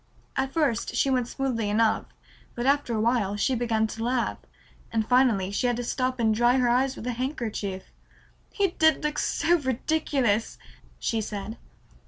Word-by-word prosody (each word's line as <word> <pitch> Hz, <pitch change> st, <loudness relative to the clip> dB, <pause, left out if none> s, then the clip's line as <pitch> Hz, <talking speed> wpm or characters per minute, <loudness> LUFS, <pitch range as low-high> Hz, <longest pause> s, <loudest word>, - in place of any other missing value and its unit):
At 265 Hz, 0 st, -1 dB
first 275 Hz, -7 st, 0 dB
she 275 Hz, -, +2 dB
went 250 Hz, -2 st, +1 dB
smoothly 240 Hz, -5 st, -2 dB
enough, 220 Hz, +1 st, +2 dB, 0.5 s
but 240 Hz, -, -3 dB
after 275 Hz, -4 st, +2 dB
a -, -, 0 dB
while 220 Hz, -3 st, +1 dB
she 235 Hz, +6 st, +1 dB
began 225 Hz, -2 st, +1 dB
to 225 Hz, +1 st, -5 dB
laugh, 245 Hz, 0 st, 0 dB, 0.5 s
and 220 Hz, -1 st, 0 dB
finally 240 Hz, -7 st, +3 dB
she 225 Hz, +5 st, 0 dB
had 245 Hz, -, +1 dB
to 245 Hz, -, -3 dB
stop 255 Hz, +1 st, -1 dB
and 220 Hz, -2 st, +3 dB
dry 240 Hz, +3 st, +3 dB
her 250 Hz, -2 st, +2 dB
eyes 260 Hz, +2 st, +2 dB
with -, -, -8 dB
a 250 Hz, -, -1 dB
handkerchief. 230 Hz, -7 st, -3 dB, 0.7 s
"He 400 Hz, -2 st, +1 dB
did 315 Hz, -4 st, +2 dB
look 300 Hz, 0 st, -1 dB
so 345 Hz, +1 st, +2 dB
ridiculous," 260 Hz, -4 st, 0 dB, 0.4 s
she 225 Hz, -1 st, -1 dB
said. 210 Hz, +1 st, -6 dB
245 Hz, 170 wpm, -26 LUFS, 220-265 Hz, 0.7 s, finally